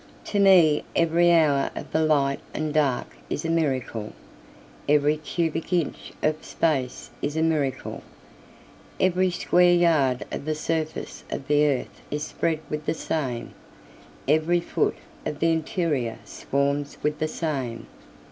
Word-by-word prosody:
To 205 Hz, -, -1 dB
me 180 Hz, -7 st, +6 dB
every 170 Hz, +1 st, +4 dB
hour 150 Hz, -5 st, +4 dB
of -, -, -7 dB
the 160 Hz, -, +2 dB
light 140 Hz, -3 st, +2 dB, 0.2 s
and 155 Hz, -1 st, -2 dB
dark 140 Hz, -, 0 dB
is -, -, -3 dB
a 165 Hz, -, 0 dB
miracle, 130 Hz, -9 st, -1 dB, 0.8 s
Every 150 Hz, 0 st, +4 dB
cubic 165 Hz, +2 st, -2 dB
inch 175 Hz, -4 st, -1 dB
of 155 Hz, 0 st, 0 dB
space 135 Hz, -6 st, -1 dB
is 145 Hz, +2 st, -2 dB
a 160 Hz, -, +2 dB
miracle, 145 Hz, -5 st, -1 dB, 1.0 s
Every 185 Hz, 0 st, +3 dB
square 175 Hz, 0 st, +4 dB
yard 155 Hz, -8 st, +3 dB
of -, -, -5 dB
the 155 Hz, 0 st, -1 dB
surface 160 Hz, 0 st, -3 dB
of 135 Hz, -, -5 dB
the 150 Hz, 0 st, +4 dB
earth 135 Hz, -3 st, -2 dB
is 150 Hz, 0 st, -2 dB
spread 160 Hz, +1 st, -1 dB
with 150 Hz, 0 st, -5 dB
the -, -, +1 dB
same, 130 Hz, -8 st, -3 dB, 0.7 s
Every 160 Hz, +4 st, +3 dB
foot 170 Hz, -, 0 dB, 0.3 s
of 150 Hz, -, -3 dB
the 165 Hz, +1 st, +3 dB
interior 155 Hz, -7 st, -1 dB
swarms 140 Hz, +1 st, -1 dB
with 150 Hz, 0 st, 0 dB
the 155 Hz, -, +1 dB
same. 135 Hz, -8 st, -3 dB
155 Hz, 140 wpm, -25 LUFS, 140-165 Hz, 1.0 s, me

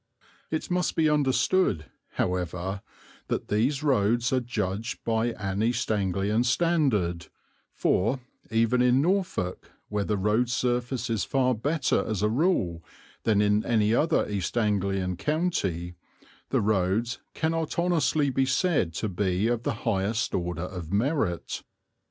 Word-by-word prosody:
It 155 Hz, +3 st, -3 dB
must 180 Hz, 0 st, 0 dB
be 160 Hz, -1 st, +3 dB
understood, 145 Hz, -, +2 dB, 0.3 s
however, 90 Hz, +2 st, -2 dB, 0.5 s
that -, -, -3 dB
these 130 Hz, +8 st, +1 dB
roads 120 Hz, -2 st, +2 dB
are 130 Hz, -, +3 dB
judged 115 Hz, -1 st, -3 dB
by 115 Hz, 0 st, +1 dB
an 100 Hz, -1 st, -3 dB
East 120 Hz, 0 st, 0 dB
Anglian 100 Hz, +2 st, +1 dB
standard, 125 Hz, -, +1 dB, 0.5 s
for, 115 Hz, +8 st, +1 dB, 0.3 s
even 115 Hz, +2 st, +2 dB
in 125 Hz, +1 st, +4 dB
Norfolk, 175 Hz, -, -1 dB, 0.2 s
where 105 Hz, -1 st, -1 dB
the 105 Hz, 0 st, -1 dB
road 105 Hz, +5 st, +1 dB
surface 125 Hz, -1 st, -1 dB
is 110 Hz, -, 0 dB
far 130 Hz, -1 st, +1 dB
better 140 Hz, +5 st, 0 dB
as 105 Hz, -2 st, -2 dB
a 105 Hz, -, +3 dB
rule 110 Hz, -, +1 dB, 0.4 s
than 105 Hz, -2 st, +3 dB
in 105 Hz, +1 st, +2 dB
any 110 Hz, -2 st, +2 dB
other 155 Hz, +6 st, +2 dB
East 100 Hz, +2 st, -3 dB
Anglian 95 Hz, -4 st, 0 dB
county, 100 Hz, -, -1 dB, 0.6 s
the -, -, +2 dB
roads 105 Hz, +3 st, 0 dB, 0.2 s
cannot 160 Hz, 0 st, -1 dB
honestly 160 Hz, -4 st, +2 dB
be 130 Hz, +1 st, +1 dB
said 130 Hz, -, +1 dB
to 110 Hz, -, -1 dB
be 95 Hz, 0 st, 0 dB
of 120 Hz, 0 st, +1 dB
the -, -, -1 dB
highest 110 Hz, +1 st, 0 dB
order 90 Hz, -2 st, -2 dB
of 90 Hz, -3 st, -7 dB
merit. 105 Hz, -, 0 dB
115 Hz, 135 wpm, -27 LUFS, 95-135 Hz, 0.6 s, in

